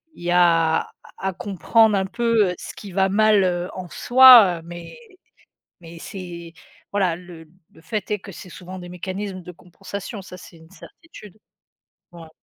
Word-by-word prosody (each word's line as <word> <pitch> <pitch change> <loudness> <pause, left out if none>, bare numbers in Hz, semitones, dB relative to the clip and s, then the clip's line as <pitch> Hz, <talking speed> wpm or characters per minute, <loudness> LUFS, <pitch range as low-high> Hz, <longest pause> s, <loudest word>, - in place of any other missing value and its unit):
il - - -14
y 175 - -1
a 165 -2 +3
à - - -14 0.3
à 190 +1 -3
comprendre 205 +3 +1
un 190 - -1
peu 230 -3 +1
ce - - -9
qui 200 -2 -10
va 190 +1 +1
mal, 210 0 +3
heu, 180 0 -2
en 185 -1 -7
soi 240 -9 +7
mais 175 - -10 0.8
mais 170 0 -12
c'est 170 -3 -9 0.4
voilà, 190 -4 0
le 175 -2 -13 0.2
le - - -20
fait 210 +1 -5
est 210 - -1
que 195 +1 -12
c'est 180 - -12
souvent 185 +1 -10
des 175 - -10
mécanismes 185 +2 -6
de 180 - -10
compensation, 195 +4 -9
ça 180 - -11
c'est 170 -1 -15
une 160 0 -19
certitude. 210 - -15 0.8
Ouais. 165 -2 -12
185 Hz, 170 wpm, -21 LUFS, 175-205 Hz, 0.8 s, soi